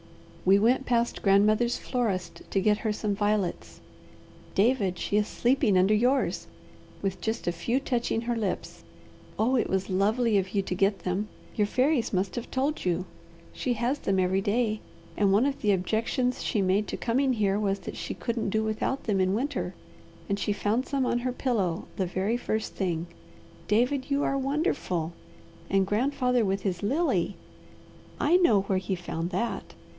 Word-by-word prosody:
We 190 Hz, +2 st, +6 dB
went 245 Hz, +6 st, +2 dB
past 235 Hz, -1 st, +1 dB
grandmother's 215 Hz, +4 st, +3 dB
florist 185 Hz, -9 st, -2 dB
to 195 Hz, -, +1 dB
get 210 Hz, +2 st, +2 dB
her 220 Hz, -, -1 dB
some 210 Hz, -1 st, -1 dB
violets 205 Hz, -2 st, -1 dB, 0.8 s
David, 200 Hz, -4 st, +2 dB
she 205 Hz, -, -2 dB
is 210 Hz, 0 st, +3 dB
sleeping 240 Hz, -5 st, +2 dB
under 190 Hz, +3 st, +4 dB
yours, 250 Hz, +6 st, +1 dB, 0.6 s
with 195 Hz, -1 st, -2 dB
just 220 Hz, +1 st, -2 dB
a 175 Hz, -, +1 dB
few 205 Hz, +10 st, -1 dB
touching 240 Hz, -4 st, -1 dB
her 240 Hz, 0 st, -1 dB
lips. 210 Hz, -5 st, -3 dB, 0.5 s
Oh 240 Hz, +5 st, +2 dB
it 235 Hz, -, +1 dB
was 190 Hz, 0 st, -1 dB
lovely 210 Hz, +3 st, +2 dB
of 190 Hz, +1 st, -4 dB
you 200 Hz, -, +2 dB
to 185 Hz, -, -3 dB
get 195 Hz, +2 st, +1 dB
them; 185 Hz, +3 st, -1 dB, 0.3 s
your 210 Hz, -2 st, +2 dB
fairies 255 Hz, +2 st, +1 dB
must 190 Hz, 0 st, -1 dB
have 240 Hz, -, -5 dB
told 275 Hz, +4 st, -1 dB
you! 180 Hz, 0 st, 0 dB, 0.5 s
She 250 Hz, -, -1 dB
has 240 Hz, +5 st, -1 dB
them 195 Hz, -1 st, 0 dB
every 185 Hz, +1 st, +2 dB
day, 215 Hz, +1 st, 0 dB, 0.4 s
and 200 Hz, -2 st, +3 dB
one 210 Hz, +6 st, +4 dB
of 280 Hz, 0 st, -1 dB
the 210 Hz, -, +3 dB
objections 225 Hz, +6 st, 0 dB
she 205 Hz, -, 0 dB
made 190 Hz, +2 st, +2 dB
to -, -, -4 dB
coming 260 Hz, +3 st, +1 dB
here 205 Hz, -3 st, +1 dB
was 200 Hz, -2 st, 0 dB
that -, -, -7 dB
she -, -, -5 dB
couldn't 230 Hz, -3 st, -2 dB
do 220 Hz, +2 st, +1 dB
without 220 Hz, +5 st, -1 dB
them 200 Hz, -4 st, +1 dB
in 185 Hz, +1 st, +2 dB
winter, 275 Hz, +6 st, -2 dB, 0.5 s
and 200 Hz, 0 st, -1 dB
she 205 Hz, -, 0 dB
found 210 Hz, +5 st, 0 dB
some 275 Hz, -2 st, 0 dB
on 240 Hz, -, +1 dB
her 250 Hz, +1 st, -1 dB
pillow 210 Hz, -9 st, -1 dB
the 190 Hz, -, 0 dB
very 190 Hz, +6 st, 0 dB
first 220 Hz, -2 st, -2 dB
thing. 170 Hz, -4 st, -1 dB, 0.6 s
David, 250 Hz, +6 st, +1 dB
you 280 Hz, 0 st, +1 dB
are 275 Hz, -, +1 dB
wonderful! 265 Hz, -, -1 dB, 0.6 s
And 195 Hz, 0 st, +3 dB
grandfather 250 Hz, +3 st, +1 dB
with 195 Hz, -1 st, -1 dB
his 180 Hz, -3 st, -2 dB
lily! 290 Hz, +12 st, +1 dB, 0.8 s
I 335 Hz, +5 st, +4 dB
know 230 Hz, -, +4 dB
where 195 Hz, -1 st, 0 dB
he 190 Hz, 0 st, -2 dB
found 175 Hz, -1 st, -4 dB
that! 235 Hz, +4 st, -3 dB
215 Hz, 175 wpm, -27 LUFS, 195-245 Hz, 0.8 s, We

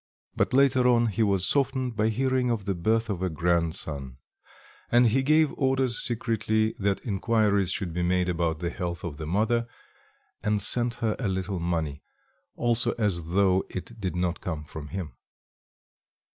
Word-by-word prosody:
But -, -, +1 dB
later 130 Hz, -1 st, +4 dB
on, 120 Hz, -1 st, +4 dB
he 105 Hz, +2 st, -2 dB
was 100 Hz, -4 st, +2 dB
softened 130 Hz, -3 st, 0 dB
by 110 Hz, +1 st, +2 dB
hearing 130 Hz, +2 st, +1 dB
of 110 Hz, -4 st, -1 dB
the 100 Hz, -, 0 dB
birth 110 Hz, +6 st, 0 dB
of 100 Hz, -4 st, -3 dB
a 95 Hz, -, 0 dB
grandson, 80 Hz, -5 st, -2 dB, 0.7 s
and 120 Hz, +1 st, +5 dB
he 120 Hz, +4 st, +3 dB
gave 155 Hz, +2 st, +3 dB
orders 130 Hz, -2 st, +1 dB
secretly 110 Hz, -2 st, +1 dB
that 100 Hz, -1 st, -1 dB
inquiries 105 Hz, -2 st, +1 dB
should 90 Hz, -4 st, -3 dB
be 90 Hz, -, -2 dB
made 90 Hz, +1 st, +1 dB
about 85 Hz, -2 st, 0 dB
the 85 Hz, 0 st, -2 dB
health 85 Hz, -2 st, -4 dB
of 75 Hz, -5 st, -5 dB
the 80 Hz, -1 st, -6 dB
mother, 115 Hz, +6 st, +1 dB, 0.7 s
and 105 Hz, -1 st, +1 dB
sent 120 Hz, +3 st, +1 dB
her 110 Hz, -, +1 dB
a 120 Hz, -, -1 dB
little 95 Hz, 0 st, -2 dB
money, 80 Hz, -4 st, -2 dB, 0.5 s
also 120 Hz, 0 st, +1 dB
as 85 Hz, -7 st, -1 dB
though 95 Hz, -1 st, +3 dB
it 110 Hz, +4 st, -8 dB
did 95 Hz, -2 st, -2 dB
not 90 Hz, -1 st, -1 dB
come 80 Hz, -4 st, -4 dB
from 75 Hz, 0 st, -9 dB
him. 85 Hz, -5 st, -6 dB
100 Hz, 165 wpm, -27 LUFS, 85-120 Hz, 0.7 s, and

